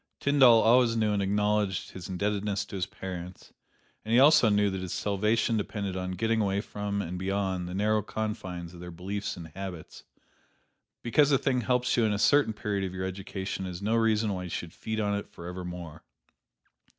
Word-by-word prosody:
Tyndall 130 -5 +6
always 115 0 +4
knew 110 -1 +2
and 100 - 0
acknowledged 105 -1 0
his 95 -1 -8
indebtedness 100 +2 -1
to - - -9
his 95 -1 -2
parents, 95 -3 -8 0.5
and 110 - -5
he 120 - +6
also 140 -4 +7
knew 105 -1 +3
that 95 -1 -4
his 90 -2 -4
salvation 105 +3 +1
depended 100 -2 -3
upon 90 0 -3
getting 110 +4 +1
away 100 -1 +1
from 100 -1 -3
and 90 +1 -5
beyond 95 -2 -1
the 90 - -5
narrow 105 +2 +2
confines 95 -5 -5
of 85 - -11
their 90 0 -8
beliefs 95 +4 -4
and 85 -2 -8
habits. 90 -1 -8 1.0
Because 145 +5 +3
a 135 - +5
thing 130 -2 0
helps 125 +1 +1
you 120 - +4
in 110 -1 +2
a - - 0
certain 140 +3 +4
period 105 -2 -2
of 95 -1 -4
your 95 0 -3
education 95 0 -4
is 90 -1 -6
no 105 +3 -1
reason 110 -2 +2
why 90 -1 -4
you - - -6
should 85 0 -5
feed 110 0 -4
upon 105 -1 0
it - - -10
forevermore. 90 -2 -8
100 Hz, 190 wpm, -28 LUFS, 95-110 Hz, 1.0 s, also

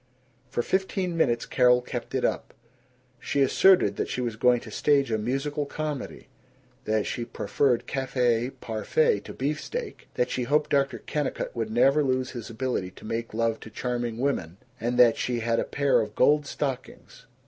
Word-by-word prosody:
For 120 - -1
fifteen 190 0 -1
minutes 120 -8 +1
Carol 125 -1 +4
kept - - -5
it - - +1
up. - - -2 0.6
She 140 +3 +1
asserted 135 - +4
that - - -2
she - - -3
was 120 -3 -2
going 125 +2 +3
to 110 - -10
stage 140 0 +2
a 110 - +2
musical 140 +6 -2
comedy, 150 -2 -5 0.6
that 110 -1 +1
she 120 - -3
preferred 125 +1 0
cafe 125 -3 0
parfait 135 - 0
to - - -10
beefsteak, 155 - -4
that 125 - 0
she 130 - -1
hoped 150 +3 +1
Dr. 140 -1 +2
Kennicott 150 -1 -3
would 115 -2 -2
never 135 +6 +4
lose 130 -1 0
his 120 -3 -7
ability 115 -5 -2
to 95 - -15
make 115 +1 -3
love 115 0 0
to - - -10
charming 120 0 -3
women, 115 -10 -2 0.2
and 120 +2 -1
that 120 -2 +6
she 120 -2 -1
had 115 0 +1
a - - +1
pair 140 -1 +2
of - - -5
gold 150 +2 +3
stockings. 135 -3 -5
125 Hz, 170 wpm, -26 LUFS, 115-140 Hz, 0.6 s, that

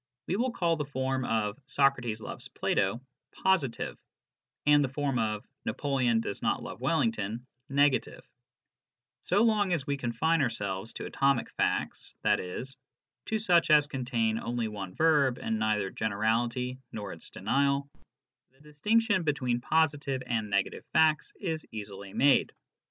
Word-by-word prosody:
We 185 - -1
will 245 +5 +1
call 170 -8 0
the 150 - -1
form 130 -1 -2
of 110 +1 -1
'' - - -48
Socrates 120 -6 +2
loves - - -7
Plato 105 +6 0 0.2
" - - -22
positive, 170 -11 +1 0.7
and 145 0 +6
the 135 - -1
form 135 -2 -1
of 110 -2 -1
" - - -53
Napoleon 130 -5 +1
does 100 - -5
not - - 0
love - - -8
Wellington 110 +2 0
" 125 - -49
negative. 130 -5 0 0.9
So 200 +5 +2
long 210 -4 +3
as 150 -6 -1
we 140 0 -1
confine 140 +6 +1
ourselves 105 -4 -2
to - - -6
atomic 135 -3 +1
facts, - - -2
i.e., 90 +5 0 0.6
to 220 - 0
such 180 -7 +3
as 150 -1 +6
contain 120 -5 -1
only 120 -1 -2
one 100 -4 -6
verb 150 -6 +3
and 110 -1 -2
neither 105 -3 0
generality 115 +4 -1
nor'* 100 -3 -5
its 80 - -11
denial, 140 +6 +1 0.6
the 130 +1 -31
distinction 205 +8 +1
between 130 -6 0
positive 145 -3 +1
and 110 -4 -1
negative 100 -1 0
facts 155 -1 +3
is 160 -5 -3
easily 100 -2 -7
made. 140 +6 +3
130 Hz, 150 wpm, -29 LUFS, 110-150 Hz, 0.9 s, and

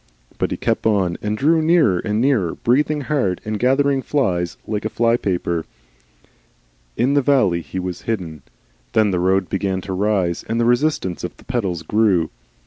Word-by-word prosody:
But - - 0
he - - -3
kept - - 0
on 95 -5 +1
and 105 0 -2
drew 160 +5 +3
nearer 155 - +3
and 105 +1 -1
nearer, 120 -10 +1
breathing 150 +5 +1
hard 130 - 0
and 110 -1 -3
gathering 135 +2 +2
flies 90 - -1
like 105 -1 -3
a 110 - -1
flypaper. 100 -8 0 1.3
In 125 +5 +2
the 145 - +4
valley 115 -11 +2
he 80 +3 -8
was 90 -1 -4
hidden. 90 -9 -4 0.5
Then 110 -2 +3
the 90 - 0
road 95 +1 +2
began 95 -1 -1
to 95 +1 -5
rise, 95 -3 0
and 115 +1 0
the 120 - +2
resistance 120 - 0
of 90 - -6
the - - -17
pedals 95 -10 -2
grew. 95 -3 +2
105 Hz, 170 wpm, -20 LUFS, 90-125 Hz, 1.3 s, the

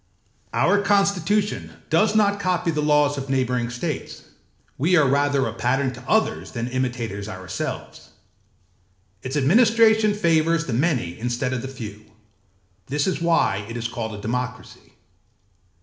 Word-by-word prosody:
âOur 205 0 +2
constitution 200 0 +1 0.2
does 210 +7 +3
not 205 -1 +3
copy 180 -3 0
the 150 -1 -1
laws 150 -1 +2
of 135 0 -7
neighbouring 125 -3 0
states; 120 0 -5 0.5
we 170 +7 +2
are 150 -5 +5
rather 140 0 +2
a 115 - -3
pattern 130 +3 0
to 120 0 -11
others 220 0 +1
than 115 0 -3
imitators 120 -5 -3
ourselves. 95 -2 -6 1.1
Its 130 +3 -3
administration 220 - +4
favours 165 -3 +2
the 125 - -3
many 120 - 0
instead 120 +2 -2
of 125 - -2
the 135 - -5
few; 110 -6 -8 0.8
this 145 +1 0
is 185 -3 -1
why 165 -12 +2
it 115 - -5
is 115 0 -2
called 110 -2 -5
a 105 - -9
democracy. 125 +3 -5
140 Hz, 140 wpm, -23 LUFS, 120-180 Hz, 1.1 s, are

